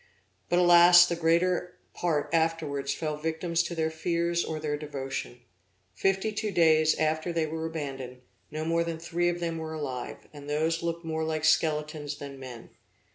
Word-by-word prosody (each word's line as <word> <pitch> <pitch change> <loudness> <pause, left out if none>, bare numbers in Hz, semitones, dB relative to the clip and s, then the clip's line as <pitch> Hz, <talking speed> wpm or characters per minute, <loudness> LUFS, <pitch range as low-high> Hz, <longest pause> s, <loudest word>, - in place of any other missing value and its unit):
But 175 - +2
alas! 175 0 +8
the 175 - -2
greater 175 +2 +1 0.2
part 160 -4 -1
afterwards 160 -4 0
fell 155 0 -3
victims 160 +2 -1
to 170 0 -4
their 160 -1 0
fears 170 +1 0
or 155 -1 -4
their 150 -1 -2
devotion. 135 -4 -6 0.5
Fifty 195 - 0
two 215 0 -2
days 160 -4 +4
after 155 +2 0
they 165 -1 0
were 160 +1 -4
abandoned, 135 -5 -6 0.3
no 155 +1 -4
more 165 +1 +1
than 165 -1 -4
three 170 +1 -1
of 175 0 -3
them 165 -1 -3
were 160 0 -5
alive, 135 -5 -6
and 145 -1 -10
those 160 +2 0
looked 170 0 -3
more 160 0 -2
like 155 -1 -1
skeletons 150 -2 +1
than 140 -1 -9
men. 125 -3 -10
160 Hz, 170 wpm, -28 LUFS, 150-170 Hz, 0.5 s, alas